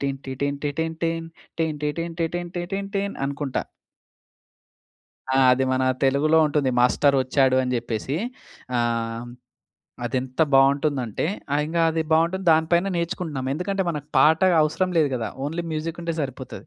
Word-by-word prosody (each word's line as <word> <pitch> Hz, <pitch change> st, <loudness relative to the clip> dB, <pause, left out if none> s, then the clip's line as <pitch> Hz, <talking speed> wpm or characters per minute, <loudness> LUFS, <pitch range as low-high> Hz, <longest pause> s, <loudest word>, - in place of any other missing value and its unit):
టిన్ 135 Hz, -1 st, -2 dB
T 130 Hz, -, -5 dB
టిన్ 140 Hz, 0 st, -1 dB
టిన్ 145 Hz, -1 st, -2 dB
టిన్ 160 Hz, 0 st, -2 dB, 0.9 s
T 150 Hz, -, +1 dB
టిన్ 165 Hz, 0 st, -4 dB
టిన్ 175 Hz, +1 st, -2 dB
టిన్ 175 Hz, -, -2 dB
టిన్ 195 Hz, 0 st, -4 dB
టీన్ 200 Hz, 0 st, -1 dB
అనుకుంటా. 140 Hz, -1 st, -2 dB, 1.7 s
ఆ! -, -, +4 dB
అది 130 Hz, +1 st, +2 dB
మన 130 Hz, -, +1 dB, 0.2 s
తెలుగులో 145 Hz, +4 st, +3 dB
ఉంటుంది. 145 Hz, -3 st, +1 dB
మాస్టరొచ్చాడు 130 Hz, 0 st, +3 dB
అని 125 Hz, 0 st, -1 dB
చెప్పేసి. 120 Hz, +4 st, -3 dB, 0.6 s
ఆహ్, 115 Hz, 0 st, -1 dB, 0.8 s
అదెంత 130 Hz, +4 st, -1 dB
బావుంటుందంటే 135 Hz, -3 st, +2 dB, 0.3 s
ఆ! -, -, +3 dB
ఇంగ 165 Hz, -, -5 dB
అది 160 Hz, 0 st, 0 dB
బావుంటుంది, 170 Hz, +4 st, +2 dB
దాని 160 Hz, 0 st, +2 dB
పైన 190 Hz, +3 st, +2 dB
నేర్చుకుంటున్నాం. 160 Hz, -6 st, -3 dB
ఎందుకంటే, 190 Hz, +3 st, -1 dB
మనకు 150 Hz, -2 st, -6 dB
పాట 160 Hz, +3 st, +5 dB, 0.2 s
అవసరం 180 Hz, +4 st, 0 dB
లేదు 145 Hz, -3 st, +3 dB
గదా! 115 Hz, -, -3 dB, 0.2 s
ఓన్లీ 170 Hz, +3 st, -3 dB
మ్యూజిక్కుంటే 165 Hz, +2 st, -3 dB
సరిపోతది. 130 Hz, 0 st, -6 dB
150 Hz, 140 wpm, -24 LUFS, 130-165 Hz, 1.7 s, పాట